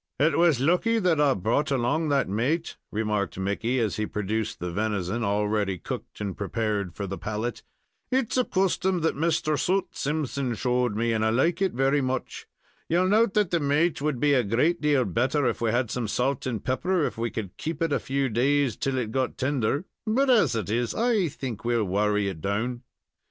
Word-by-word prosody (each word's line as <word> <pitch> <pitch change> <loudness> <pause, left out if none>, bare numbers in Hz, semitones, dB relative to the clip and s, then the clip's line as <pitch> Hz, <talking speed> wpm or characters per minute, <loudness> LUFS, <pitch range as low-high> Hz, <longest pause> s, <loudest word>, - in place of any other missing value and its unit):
"It 150 0 +3
was 165 -6 +4
lucky 180 - +2
that 180 -7 +2
I 140 -2 +4
brought 120 - 0
along 140 +4 +1
that 140 -1 +2
maat," 125 - -1 0.2
remarked 105 -4 -1
Mickey, 100 +6 -1
as 110 -4 0
he 110 0 -1
produced 105 +2 -2
the 90 0 -4
venison, 105 +2 -1
already 105 -1 0
cooked - - -7
and 100 -3 -3
prepared 100 -3 -2
for 100 - -4
the 95 0 -5
palate. 110 +3 -3 0.5
"It's 255 -3 +1
a 255 - +3
custom 190 -3 0
that 160 - +1
Mr. 155 -1 0
Soot 190 +2 0
Simpson 140 -4 -2
showed 125 -1 0
me, 115 +2 0
and 110 -1 0
I 110 - +3
like 150 - +1
it 190 -2 +1
very 135 +3 +2
much. 130 -1 -3 0.4
You 180 +3 +3
note 215 +1 +3
that 210 -4 +2
the 170 - +2
maat 150 +2 +1
would 150 -4 -1
be 145 +1 +3
a 130 -3 +3
great 130 - +1
deal 145 -4 +3
better 130 - +1
if 120 - -1
we 115 - +2
had 120 0 0
some 120 -3 -2
salt 130 +5 -1
and 115 -5 -4
pepper, 170 +7 +1
or - - +3
if - - -3
we 115 +1 0
could 105 -5 -6
keep 160 -1 -4
it 165 -3 0
a - - +2
few 135 0 -1
days 130 +1 +1
till 135 -2 -1
it 115 -4 -2
got 130 +1 -1
tender; 140 - 0 0.2
but, 260 +5 +3
as 225 - +4
it 110 -2 -2
is, 120 +1 0
I 225 -6 +2
think 130 -6 -6
we'll 120 -2 +1
worry 105 +1 +1
it 90 -5 -5
down." 115 +6 -2
130 Hz, 205 wpm, -26 LUFS, 110-155 Hz, 0.5 s, was